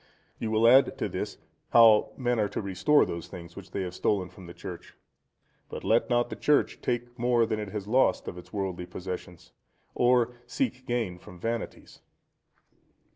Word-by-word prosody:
You 115 - -2
will 110 +1 +4
add 130 +3 +6
to - - -1
this, - - -4 0.4
how 110 -2 +7
men 125 -2 0
are 105 -1 +1
to - - -4
restore 100 +9 +3
those 85 -1 -5
things 85 -1 -10
which 100 - -10
they 95 - -3
have 90 -1 -5
stolen 95 -1 0
from 95 -3 -13
the 85 - -9
church. 90 -3 -9 0.7
But - - -7
let 115 +2 +2
not 120 0 +1
the - - -3
Church 150 -1 +1
take 120 0 -3
more 120 -1 +3
than 110 -1 -2
it 105 -2 -5
has 105 -1 -5
lost 130 +5 +2
of - - -5
its 90 0 -12
worldly 95 -3 -3
possessions, 90 -1 -7 0.4
or 125 -1 +3
seek 130 - -2
gain 115 -8 -2
from 90 0 -13
vanities. 115 +4 -5
110 Hz, 180 wpm, -28 LUFS, 90-120 Hz, 0.7 s, how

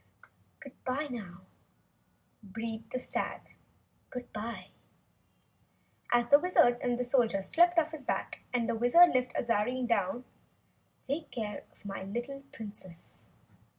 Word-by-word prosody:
"Goodbye, 275 0 -4
now," 195 -7 -7 1.0
breathed 225 +2 -6
the - - -1
stag, 255 - -2 2.7
as 240 0 +3
the 285 - +8
Wizard 270 -8 +4
and 245 0 0
Soldier 235 -6 +2
slipped 345 - +4
off 320 -1 +3
his 310 -3 -7
back - - -2
and 240 -2 +1
the - - +1
Wizard 245 +10 +6
lifted 250 -1 0
Azarine 240 +2 +1
down. 230 +1 +1 0.8
"Take 290 +4 -3
care 210 -4 -5
of - - -25
my 195 -1 -5
little 240 +8 -4
Princess!" 200 -6 -10
240 Hz, 115 wpm, -31 LUFS, 215-275 Hz, 2.7 s, the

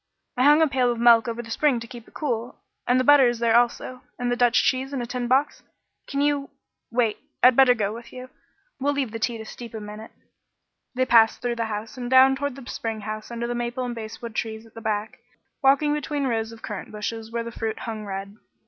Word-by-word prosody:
I 250 - -1
hung 295 +2 +6
a - - +4
pail 255 -3 +1
of 240 - -3
milk 235 -1 +6
over 235 0 -4
the 230 - -10
spring 275 0 +2
to 230 - -8
keep 240 -1 -11
it - - -21
cool, 240 -5 -3 0.3
and 250 +1 +4
the - - +2
butter 285 -1 +7
is 240 0 0
there 230 -1 +2
also 245 +1 +1 0.2
and 245 0 -1
the - - +2
Dutch 245 -1 +3
cheese 265 +2 0
in 270 - -2
a 240 - -3
tin 245 0 -3
box. 270 +4 +1 0.5
Can 280 0 -2
you 285 -1 0 0.4
wait, 230 -2 0 0.2
I'd 250 0 +7
better 260 -1 +6
go 210 -2 -1
with 235 +1 -10
you. 255 0 -10 0.5
We'll 285 +2 +1
leave 275 -5 -2
the 225 - -5
tea 230 +1 -1
to 220 - -8
steep 230 +1 -9
a - - -4
minute." 210 +1 -9 0.9
They 255 +1 +2
passed 225 -3 +4
through 240 -1 -1
the 230 - -1
house 215 +3 -5
and 245 -1 -4
down 260 +1 +6
toward 285 -1 -3
the 270 -2 -11
spring 225 -3 -4
house 215 +1 -6
under 235 0 -4
the 240 - -2
maple 240 +1 -3
and 245 - -3
basswood 225 0 -7
trees 220 0 -4
at 225 - -19
the 225 - -10
back, 215 -1 -3 0.4
walking 280 +2 +4
between 295 -1 -2
rows 225 -3 -1
of 225 0 -13
currant 210 -2 -6
bushes 220 +1 -5
where 235 0 -2
the 235 - -7
fruit 225 -1 -4
hung 220 -2 -5
red. 195 0 -6
240 Hz, 240 wpm, -24 LUFS, 225-255 Hz, 0.9 s, butter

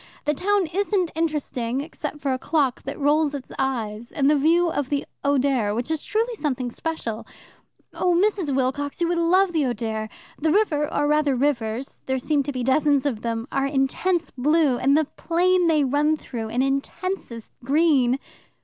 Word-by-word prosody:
The 300 - +2
town 400 +4 +1
isn't 390 -2 0
interesting, 280 -6 -2
except 300 0 -6
for 275 -2 0
a 255 - -2
clock 275 -4 0
that 275 - -5
rolls 295 +1 +2
its 275 - -8
eyes, 235 -4 -2
and 275 -2 +1
the - - +4
view 330 +5 +3
of 290 -4 -2
the 285 -1 -1 0.2
Oder, 265 -7 +1
which 240 +5 -3 0.2
truly 455 +3 0
is 450 - -10
something 255 -5 -2
special. 235 -8 -4 0.7
Oh, 355 -1 +1
Mrs. 365 -6 +1
Wilcox, 275 +3 -1
you 340 - +1
would 345 -1 +1
love 360 +2 +3
the 315 -3 +2
Oder! 220 -2 -3 0.3
The 315 +1 +1
river, 305 -7 +1
or 290 - +1
rather 300 -2 +2
rivers 245 -2 -1
there 265 0 0
seem 285 +3 +1
to 285 +1 -3
be 255 -2 -3
dozens 280 +2 +2
of 240 -7 -1
them 230 0 -3
are 275 0 0
intense 300 +5 0
blue, 290 0 +2
and 275 +3 +3
the 315 - +2
plain 355 +4 +1
they 310 -3 +3
run 295 +3 +2
through 230 -6 -6
an 245 +3 0
intensest 275 - -3
green." 275 -3 +3
285 Hz, 175 wpm, -23 LUFS, 255-325 Hz, 0.7 s, the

